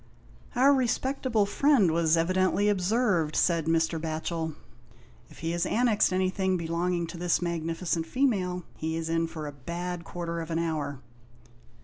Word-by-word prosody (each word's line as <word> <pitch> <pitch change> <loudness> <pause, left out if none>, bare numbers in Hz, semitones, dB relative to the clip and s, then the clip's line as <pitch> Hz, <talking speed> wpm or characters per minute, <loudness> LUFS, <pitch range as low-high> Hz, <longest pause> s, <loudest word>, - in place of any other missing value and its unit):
" - - -25
Our 270 +3 +5
respectable 260 -3 +1
friend 220 - +3
was 165 0 +3
evidently 185 +4 +2
observed," 195 -5 +1
said 165 -3 +2
Mr. 165 0 +1
Batchel. 160 0 -3 0.4
" - - -27
If - - -16
he 165 - 0
has 170 0 0
annexed 230 -4 +2
183 185 - +1
G 190 - +2
HOST 185 +2 -2
TALES. 190 -1 0 0.4
anything 180 - +1
belonging 170 -1 -2
to 175 - -9
this 175 -2 +2
magnificent 165 0 -2
female, 185 -7 0
he 160 +1 -2
is 165 0 -3
in 165 0 +1
for 160 -2 -7
a 145 - -5
bad 170 +5 -5
quarter 170 0 -4
of 165 - -7
an 165 - -1
hour." 150 -5 -2
170 Hz, 175 wpm, -28 LUFS, 165-195 Hz, 0.4 s, Our